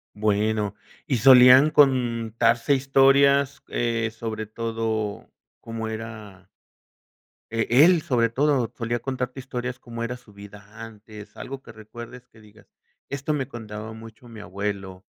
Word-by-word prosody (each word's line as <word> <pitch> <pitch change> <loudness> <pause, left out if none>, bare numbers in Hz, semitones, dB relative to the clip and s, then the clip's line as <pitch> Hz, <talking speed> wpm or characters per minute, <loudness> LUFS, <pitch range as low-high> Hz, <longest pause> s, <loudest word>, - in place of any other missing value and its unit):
Bueno, 105 0 0 0.3
¿y 130 -5 0
solían 130 +4 +8
contarse 115 -3 +2
historias, 135 +1 +3
eh, 115 -1 -1
sobre 110 -1 -5
todo 110 -1 -4 0.3
cómo 115 -1 -6
era? 110 -4 -8 1.1
Eh, 115 -1 0 0.2
él 180 -1 +5
sobre 115 -4 +1
todo, 130 -1 0
¿solía 120 0 -2
contarte 130 0 -4
historias 125 -1 -5
cómo 115 -1 -6
era 125 +2 -4
su 120 -4 -20
vida 100 0 -13 0.2
antes? 105 -1 -13
Algo 135 +1 -7
que - - -13
recuerdes 120 +3 -12
que 110 - -20
digas: 105 -1 -20 0.4
"Esto 140 +2 -3
me 135 -2 -3
contaba 110 -2 -8
mucho 110 +2 -13
mi 115 -1 -12
abuelo". 100 -2 -5
115 Hz, 130 wpm, -24 LUFS, 110-125 Hz, 1.1 s, solían